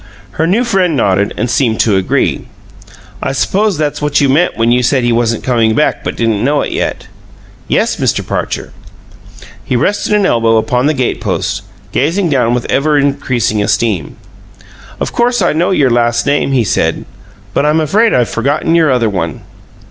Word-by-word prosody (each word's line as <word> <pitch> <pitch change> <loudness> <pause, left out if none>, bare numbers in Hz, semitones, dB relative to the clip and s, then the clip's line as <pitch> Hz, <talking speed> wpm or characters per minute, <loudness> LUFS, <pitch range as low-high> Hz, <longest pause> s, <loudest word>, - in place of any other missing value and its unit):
Her 160 - -1
new 210 +8 +2
friend 190 -8 +1
nodded 100 -3 +1
and 125 - -1
seemed 120 -2 0
to 105 -3 +2
agree. 95 -1 0 0.7
"I - - -2
suppose 200 +6 0
that's 150 -1 -2
what 150 -1 +1
you 140 - +2
meant 160 +7 +1
when 115 +1 +2
you 125 +1 +3
said 130 +1 +1
he 120 - +1
wasn't 115 -1 0
coming 115 -3 +1
back 150 - 0
but - - -4
didn't 115 -2 0
know 145 +2 +1
it - - -3
yet?" - - -3 0.6
"Yes, - - 0
Mr. - - -1
Parcher." - - -4 0.9
He 125 - -2
rested 205 - 0
an 205 -2 +3
elbow 115 -7 +2
upon 125 +4 +1
the 155 - +1
gate 130 -2 -1
post, - - -2 0.3
gazing 170 +7 0
down 120 -3 +2
with 125 - -3
ever 150 +2 +1
increasing 130 -6 0
esteem. 105 -5 -1 0.8
"Of - - -3
course 240 +1 +1
I 175 -5 +1
know 170 +3 +1
your 140 -9 +2
last 120 0 +1
name," 145 -1 +1
he 130 -3 +2
said, - - -1 0.5
"but - - +1
I'm 150 +2 +2
afraid 205 +9 +2
I've 120 -2 +2
forgotten 145 +7 -1
your 165 -2 +3
other 125 -3 +1
one." 85 -7 -3
130 Hz, 180 wpm, -13 LUFS, 115-155 Hz, 0.9 s, you